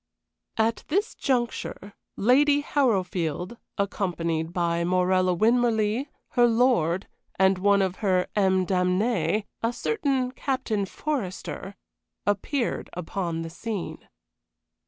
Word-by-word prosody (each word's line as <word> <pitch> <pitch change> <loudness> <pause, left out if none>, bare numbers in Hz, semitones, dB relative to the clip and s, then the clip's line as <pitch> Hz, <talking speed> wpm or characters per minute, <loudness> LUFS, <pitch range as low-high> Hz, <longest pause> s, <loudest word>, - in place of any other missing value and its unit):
At 225 +1 +1
this 405 +8 0
juncture 240 -5 -2 0.2
Lady 285 +6 +4
Harrowfield, 190 - 0 0.2
accompanied 170 -5 -1
by 170 -1 0
Morella 185 +1 +2
Winmarleigh, 230 - +2 0.2
her 240 -1 +4
lord, 225 -7 +2 0.3
and 190 0 +4
one 200 +1 +4
of 190 -1 -2
her 185 -4 +2
âmes 190 -2 +3
damnées, 185 +1 +1 0.2
a 230 - +1
certain 265 - 0
Captain 255 -7 -2
Forester, 200 -7 -4 0.5
appeared 230 +6 -1
upon 170 -1 -3
the 165 - -7
scene. 205 +2 -5
200 Hz, 100 wpm, -26 LUFS, 180-240 Hz, 0.5 s, Lady